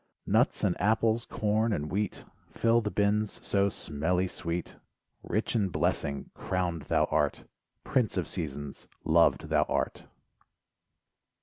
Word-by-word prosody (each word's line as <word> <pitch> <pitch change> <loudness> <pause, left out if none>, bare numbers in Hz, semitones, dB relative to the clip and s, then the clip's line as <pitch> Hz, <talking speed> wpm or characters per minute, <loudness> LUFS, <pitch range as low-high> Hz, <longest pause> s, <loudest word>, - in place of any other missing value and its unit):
Nuts - - +2
and 90 - +2
apples, 110 +2 +2
corn 110 +2 0
and 75 -6 -2
wheat, 105 0 -2 0.2
Fill 115 +1 +2
the 105 - -2
bins 105 +1 0
so 100 0 +2
smelly 90 +2 -1
sweet, 85 -1 -4 0.4
Rich 110 +3 -1
in 100 -4 +2
blessing, 70 -4 -1
crowned 90 -3 -2
thou - - +3
art, - - +1 0.4
Prince 125 -7 +1
of 90 - -1
seasons, 75 -5 -5 0.2
loved - - +3
thou - - +3
art. - - -2
100 Hz, 125 wpm, -29 LUFS, 85-110 Hz, 0.4 s, thou